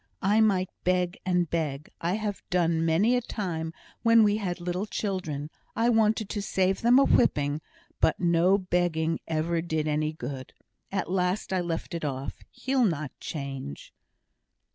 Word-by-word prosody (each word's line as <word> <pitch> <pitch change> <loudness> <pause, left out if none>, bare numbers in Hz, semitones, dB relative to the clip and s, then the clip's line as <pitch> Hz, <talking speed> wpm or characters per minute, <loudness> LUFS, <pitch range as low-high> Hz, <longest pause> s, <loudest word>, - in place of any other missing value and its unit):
I 205 +3 +4
might 190 -4 +2
beg 180 -1 +1
and 180 -1 +2
beg 150 -3 -3
I 170 +2 0
have 210 -2 -3
done 170 -2 +2
many 180 +9 +3
a 245 - +1
time, 170 -8 -3 0.3
when 230 -1 +6
we 210 0 +3
had 185 -4 -3
little 180 +4 -2
children, 185 -10 -3
and 150 - -7 0.3
I 230 +1 +2
wanted 220 -2 +3
to 205 - -2
save 190 -1 +1
them 240 +2 +6
a 275 - +7
whipping 145 - +2 0.4
but 160 - +2
no 175 +2 +4
begging 175 -4 0
ever 165 +1 0
did 160 -2 -1
any 155 0 0
good. 130 -2 -7 0.4
At 190 -2 -2
last 185 +1 0
I 185 - +2
left 170 -1 -4
it 170 - -4
off. 135 -2 -4
He'll 260 -2 +1
not 155 -7 -1
change." 135 - -6
175 Hz, 165 wpm, -27 LUFS, 160-200 Hz, 0.4 s, a